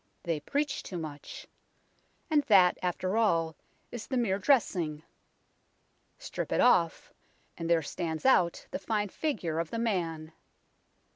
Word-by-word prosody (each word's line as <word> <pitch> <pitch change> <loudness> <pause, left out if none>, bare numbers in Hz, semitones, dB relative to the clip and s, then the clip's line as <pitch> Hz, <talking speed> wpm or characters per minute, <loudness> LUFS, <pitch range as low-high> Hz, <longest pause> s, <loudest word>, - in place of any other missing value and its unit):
They 165 -3 -1
preach 285 - -2
too 180 - -7
much. 155 -3 -8 0.9
And 300 -1 +5
that, 185 -4 +5
after 185 +3 -1
all, 165 -8 +2 0.4
is 240 -2 -7
the 260 - -1
mere 200 -5 +1
dressing. 180 - +1 1.1
Strip - - -5
it - - +1
off, 170 -9 +3 0.4
and 165 0 -5
there 165 -2 +3
stands 160 - -4
out 180 -10 +3
the - - -3
fine 205 +1 -1
figure 185 - -2
of 165 -1 -2
the - - -4
man. 165 -8 -2
180 Hz, 135 wpm, -30 LUFS, 165-225 Hz, 1.1 s, And